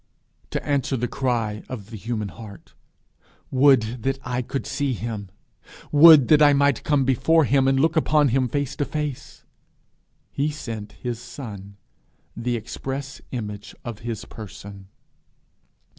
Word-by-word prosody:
To - - -4
answer 140 -2 0
the 125 +1 -1
cry 115 -6 -1
of 110 -4 -8
the - - -7
human 110 -1 -4
heart, 105 0 -12 0.8
'Would 130 -4 +3
that 135 +2 -1
I 125 -1 -2
could 135 +3 -4
see 140 -2 -1
him! 110 -3 -5 0.6
would 150 -3 +8
that 155 -1 +6
I 145 -1 +7
might 140 -2 +2
come 145 -3 +2
before 160 +5 +3
him, 135 +2 +3
and 135 0 +3
look 160 +3 +2
upon 150 -2 +3
him 130 +1 +2
face 140 +2 -2
to 145 - 0
face!' 150 -4 -5 0.9
he 145 +2 0
sent 115 -8 -6
his 120 -2 -5
son, 105 -6 -9 0.6
the 120 +1 -2
express 135 +4 -6
image 105 -5 -6
of 115 -3 -6
his 115 -2 -5
person. 100 -2 -10
125 Hz, 145 wpm, -23 LUFS, 110-140 Hz, 0.9 s, would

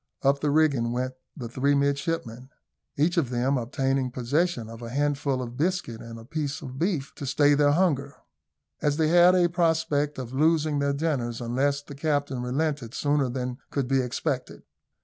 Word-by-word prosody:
Up 140 +1 +3
the 150 - +1
rigging 140 -6 +2
went 130 +1 -2 0.2
the 120 - -5
three 135 +4 +1
midshipmen, 140 -3 -1 0.5
each 170 +5 +2
of 150 -8 +2
them 125 +3 +1
obtaining 135 +1 0
possession 130 +1 -1
of 115 +1 -10
a 115 - -6
handful 140 0 0
of 120 0 -8
biscuit 165 -8 -1
and 115 0 -9
a 115 - -11
piece 150 +3 -3
of 130 -1 -7
beef 165 -6 -1
to 140 - -7
stay 145 +2 +4
their 145 0 +4
hunger, 145 -5 +1 0.7
as 145 0 +1
they 160 -1 +2
had 175 +2 +6
a 175 -1 +4
prospect 160 -4 +1
of 130 -1 -6
losing 155 +1 +2
their 140 0 +1
dinners 140 -6 -1
unless 135 +4 0
the 145 - -10
captain 145 -3 -1
relented 135 -1 -2
sooner 145 -2 +1
than 125 0 -4
could 140 -3 -1
be 135 0 +2
expected. 130 +1 -3
140 Hz, 175 wpm, -26 LUFS, 125-150 Hz, 0.7 s, had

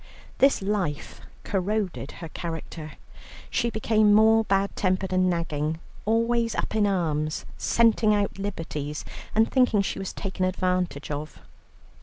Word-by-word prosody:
This 275 -6 +4
life 190 -7 -2 0.2
corroded 195 -5 -2
her 165 -2 -8
character. 160 -1 -6 0.6
She 235 -1 +1
became 215 -2 +3
more 220 +1 +6
bad 195 0 +1
tempered 185 -1 0
and 185 0 +3
nagging, 160 -2 -1 0.3
always 230 +1 +1
up - - -2
in 210 -2 +3
arms, 155 -5 -1
scenting 225 -2 +3
out 200 -1 -1
liberties, 155 -7 -4 0.3
and 220 +1 +3
thinking 250 -6 +3
she 195 - -3
was 195 - -4
taken 190 -1 -4
advantage 180 -5 -1
of. 150 +1 -5
195 Hz, 130 wpm, -26 LUFS, 165-215 Hz, 0.6 s, more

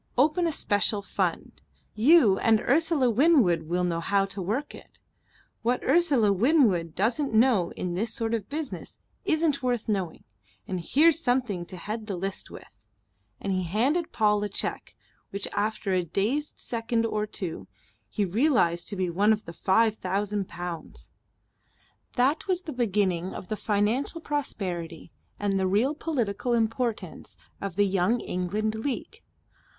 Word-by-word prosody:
Open 310 +6 +3
a - - 0
special 205 -5 0
fund. - - -3 0.3
You 230 - +5
and 225 -1 +4
Ursula 300 0 +2
Winwood 225 - +3
will 180 +1 +1
know 170 -2 0
how 195 +3 +1
to 195 0 -7
work 225 +11 -2
it. - - -14 0.6
What 245 +2 0
Ursula 275 -9 +3
Winwood 195 - +3
doesn't 230 +6 0
know 220 -7 +4
in 180 -1 -4
this 220 +6 -1
sort 230 -2 -1
of 220 -4 -2
business 300 -1 -5 0.3
isn't 315 -3 +1
worth 245 -3 -1
knowing 190 -6 -2 0.4
and 185 - -2
here's 300 - +4
something 245 - 0
to 185 - -8
head 215 +4 -5
the 200 - -3
list 195 +2 -4
with." - - -14 0.5
And 195 - -2
he 185 - 0
handed 250 - 0
Paul 210 -2 +2
a 210 - -2
cheque, - - -4 0.3
which 200 0 -5
after 210 -1 -1
a 180 -1 +2
dazed 220 - -1
second 230 0 -1
or 215 -1 -1
two 185 -5 -5 0.4
he 210 - 0
realized 185 - +2
to 205 - -4
be 185 -1 -1
one 205 +5 +4
for 210 -5 -11
five 215 +5 +2
thousand 200 +1 -2
pounds. 175 -2 -7 1.0
That 270 +9 +1
was 365 -1 0
the 315 - -6
beginning 195 -7 0
of 180 - -8
the 215 - -1
financial 210 - 0
prosperity 185 - -4 0.3
and 200 -1 0
the 190 - +1
real 220 +10 +2
political 245 -7 -2
importance 225 -4 -2 0.2
of 195 -3 -4
the 205 +1 +3
Young 195 +5 +1
England 205 +5 -2
League. 230 +4 -4
215 Hz, 150 wpm, -27 LUFS, 190-255 Hz, 1.0 s, You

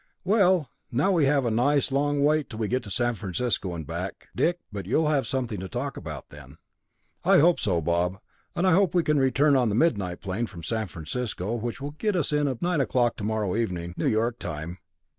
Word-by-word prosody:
"Well, 185 - +3 0.2
now 140 +11 +2
we 165 -6 +3
have 135 -1 +2
a 115 - +1
nice 140 +5 +2
long 145 +1 +1
wait 150 0 +2
till 110 - -8
we 110 -2 -1
get 125 +4 0
to - - -8
San 120 +5 +1
Francisco 95 -1 -2
and 80 -2 -6
back, - - -6
Dick, 175 +1 +2
but 100 -3 -6
you'll 150 +7 +2
have 145 -3 +1
something 125 -6 -2
to 95 0 -6
talk 135 +3 -3
about 75 -5 -7
then!" - - -13 0.7
"I - - +5
hope 170 +4 +5
so, 90 -6 0
Bob, 85 +3 0 0.4
and 175 - +1
I 185 - +5
hope 185 -1 +3
we 175 - +4
can 150 -1 +2
return 135 +2 +3
on 125 -4 +3
the 105 - 0
midnight 100 - +1
plane 100 +5 -3
from 85 -5 -10
San 110 +6 -2
Francisco, 100 +4 -4
which 120 +1 -3
will 145 +1 -4
get 205 +7 -1
us 155 -4 0
in 150 -1 +2
at 130 0 -3
nine 175 -4 +2
o'clock 120 -3 +1
tomorrow 110 -1 -1
morning, 90 -5 -2
New - - -1
York 115 +2 +1
time. 80 +4 -6
120 Hz, 215 wpm, -26 LUFS, 100-145 Hz, 0.7 s, I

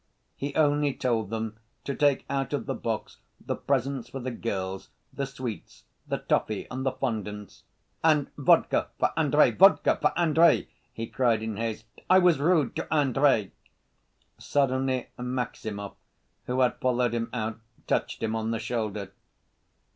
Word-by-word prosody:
He 140 0 -5
only 145 -2 +2
told 115 -5 0
them 110 0 -4 0.2
to 140 - -3
take 145 -1 +2
out 135 +1 -2
of 140 -5 -1
the - - -2
box 110 -2 -4 0.2
the - - -3
presents 135 -1 -1
for 135 - -6
the 130 0 -4
girls, 95 -5 -4 0.2
the 140 - -3
sweets, 130 -5 -7 0.2
the - - -1
toffee 110 -2 -1
and 130 +1 -3
the 135 - 0
fondants. 105 -5 -5 0.4
"And 155 -3 +3
vodka - - +3
for - - +2
Andrey, - - +4
vodka - - +5
for - - +3
Andrey!" 165 -1 +4 0.2
he 115 - -5
cried 115 -3 +1
in 110 -2 -4
haste. 110 -1 -3 0.2
"I 185 - +7
was 180 -5 +4
rude 155 -3 +2
to 165 - -5
Andrey!" 135 -7 +3 0.9
Suddenly 130 -2 0
Maximov, 120 -5 -4 0.5
who 125 +1 0
had 125 - +2
followed 125 -2 +1
him 115 -1 -2
out, 110 -2 -3 0.3
touched - - -1
him 110 0 0
on 110 0 -2
the 115 - 0
shoulder. 105 -4 -3
125 Hz, 150 wpm, -27 LUFS, 110-140 Hz, 0.9 s, I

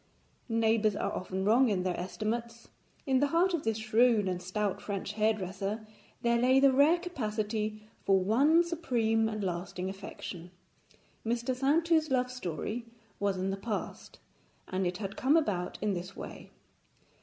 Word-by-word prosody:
Neighbours 225 -2 +2
are - - -1
often 190 +1 -3
wrong 240 +4 +5
in 190 -3 0
their 180 -1 -1
estimates. 230 +5 -4 0.4
In 265 -3 +3
the 285 - +3
heart 345 +5 +2
of 335 - -1
this 225 -1 0
shrewd 220 -1 +3
and 180 -1 -2
stout 190 +2 -2
French 200 0 -4
hairdresser 210 0 -1 0.4
there 235 0 +3
lay 255 +2 +5
the 275 -1 +5
rare 290 +6 +5
capacity 215 - -3 0.2
for 195 -1 +4
one 275 - +4
supreme 235 -10 +1
and 215 -1 -4
lasting 180 +1 -3
affection. 190 -2 -8 0.7
Mr. 235 +2 -1
Saintou's 315 +4 +2
love 250 -1 +1
story 230 - -4 0.3
was 200 -2 0
in 190 +1 -1
the 195 - -3
past, 210 +1 -5 0.5
and 185 0 -1
it 180 0 -3
had 200 -1 -5
come 280 +5 +3
about 195 - -1
in 210 -2 +1
this 180 +2 -5
way. - - -9
220 Hz, 155 wpm, -30 LUFS, 195-255 Hz, 0.7 s, wrong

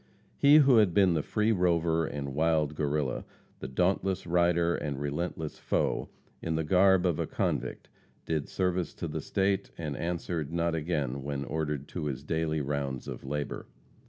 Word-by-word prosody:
He 140 +1 +6
who 140 -5 +7
had 105 -6 +4
been 95 -3 +5
the 80 - +1
free 105 +7 +1
rover 85 -4 +2
and 70 -2 -5
wild 80 -1 +2
Guerrilla, 75 -3 -1 0.4
the - - -5
dauntless 95 +6 0
rider 85 0 +2
and 70 -4 -3
relentless 75 +2 -3
foe, - - 0 0.3
in 80 -1 -2
the 80 - 0
garb 95 +3 +4
of 85 -4 +1
a - - -1
convict - - -2 0.4
did 80 -3 -2
service 90 -2 -1
to - - -4
the - - -4
State, 95 0 0
and 75 -4 -4
answered 85 -2 -3
not 85 0 0
again 75 -5 -1
when 70 0 -3
ordered 75 -2 -3
to 85 -4 -4
his 70 -3 -3
daily 80 -1 -1
rounds 70 -2 -3
of - - -6
labor. 75 +2 -4
80 Hz, 165 wpm, -29 LUFS, 75-90 Hz, 0.4 s, who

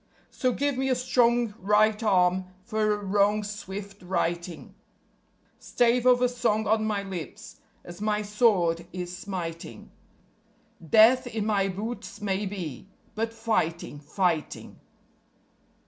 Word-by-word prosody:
_So 255 -3 -1
give 285 -2 0
me 265 0 0
a 255 - +3
strong 240 -2 +2
right 210 +2 +3
arm 185 -3 +2 0.2
for 215 -1 0
a - - -1
wrong's 205 +1 +1
swift 200 -1 -8
righting; 175 -2 -3 0.9
Stave 245 +1 +1
of 250 0 +5
a - - +5
song 230 -3 0
on 215 +1 +2
my 205 -2 -1
lips 180 -8 -8 0.3
as 175 +2 -11
my 210 0 0
sword 190 -6 +2
is 180 -1 -5
smiting; 170 - -7 0.9
Death 225 - +5
in 220 -3 -3
my 200 -3 +1
boots 210 +6 -6
may 200 0 -1
be, 185 -4 -6 0.2
but 225 +1 -2
fighting, 215 -10 -2
fighting. 165 +1 -2
205 Hz, 125 wpm, -27 LUFS, 180-225 Hz, 0.9 s, of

